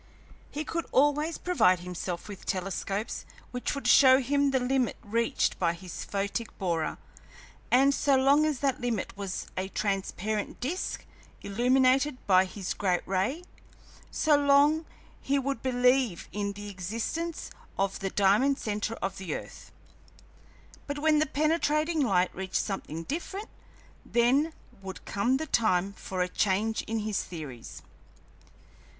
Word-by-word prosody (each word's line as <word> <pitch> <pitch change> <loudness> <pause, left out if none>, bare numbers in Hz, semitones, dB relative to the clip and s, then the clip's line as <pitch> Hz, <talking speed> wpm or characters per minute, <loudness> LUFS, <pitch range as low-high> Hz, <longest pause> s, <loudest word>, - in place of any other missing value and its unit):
He 300 - -4
could 335 +1 -3
always 295 +3 +2
provide 185 - +3
himself 180 -1 -5
with 200 -2 -9
telescopes 195 +3 -2 0.3
which 250 +3 -2
would 280 - -3
show 260 -2 +8
him 280 +2 +2
the 265 -1 +2
limit 255 0 0
reached 230 +2 0
by 170 -2 +2
his 175 0 -7
photic 200 +3 -2
borer, 170 -5 -1 0.7
and 270 +3 +5
so 280 0 +3
long 275 +3 +5
as 305 -4 0
that 270 -3 0
limit 235 -5 -2
was 195 -2 -4
a 185 +1 -2
transparent 205 +1 -2
disk, 330 +10 -3 0.4
illuminated 255 +6 +3
by 185 -1 +5
his 190 0 -4
great 180 -3 0
ray, 195 - 0 0.7
so 310 -2 +3
long 285 +2 +4 0.3
he 280 +1 +1
would 275 -3 -2
believe 250 -5 +2
in 200 -1 -2
the 205 +1 -8
existence 230 - -4 0.3
of 195 0 0
the 195 - -2
diamond 210 +9 +3
centre 210 -1 -2
of 195 - -3
the 180 -5 -3
earth. - - -9 1.2
But 285 0 -3
when 305 0 +3
the 310 - +2
penetrating 310 +2 +1
light 190 -9 +2
reached 190 0 -6
something 165 -5 -2
different, 360 - -5 0.5
then 260 +7 +2 0.3
would 190 -1 -8
come 240 +6 +1
the 315 - -3
time 200 - +1
for 185 -2 -3
a - - -2
change 210 +4 0
in 225 0 -1
his 210 -2 -1
theories. 145 -9 -8
230 Hz, 140 wpm, -28 LUFS, 195-280 Hz, 1.2 s, show